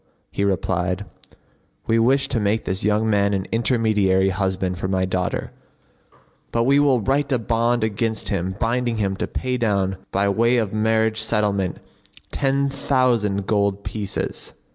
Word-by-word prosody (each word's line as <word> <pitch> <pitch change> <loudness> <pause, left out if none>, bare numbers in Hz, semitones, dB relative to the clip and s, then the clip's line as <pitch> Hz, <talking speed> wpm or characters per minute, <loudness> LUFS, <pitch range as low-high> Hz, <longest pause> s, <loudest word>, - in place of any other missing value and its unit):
He 100 - -2
replied, 95 0 -1 0.8
"We 115 0 +2
wish 135 +4 +3
to 120 - 0
make 105 +2 0
this 95 +1 -2
young 105 +2 +2
man 100 -1 +2
an 95 -1 -2
intermediary 110 -5 +2
husband 95 -1 -2
for 95 - -2
my 95 -1 0
daughter; 90 -2 -2 1.0
but 115 - +1
we 140 +3 +4
will 135 -5 +3
write 140 +5 0
a 130 - +3
bond 115 +1 0
against 110 +1 -1
him 95 -1 -2
binding 120 0 0
him 100 -2 0
to - - -2
pay 130 0 -2
down 100 -5 0
by 100 +1 +1
way 115 +5 +2
of 110 -4 -1
marriage 110 0 +1
settlement 105 -5 0 0.5
ten 140 0 +1
thousand 120 -8 +1
gold 100 -1 0
pieces. 100 -3 -4
105 Hz, 150 wpm, -22 LUFS, 95-115 Hz, 1.0 s, we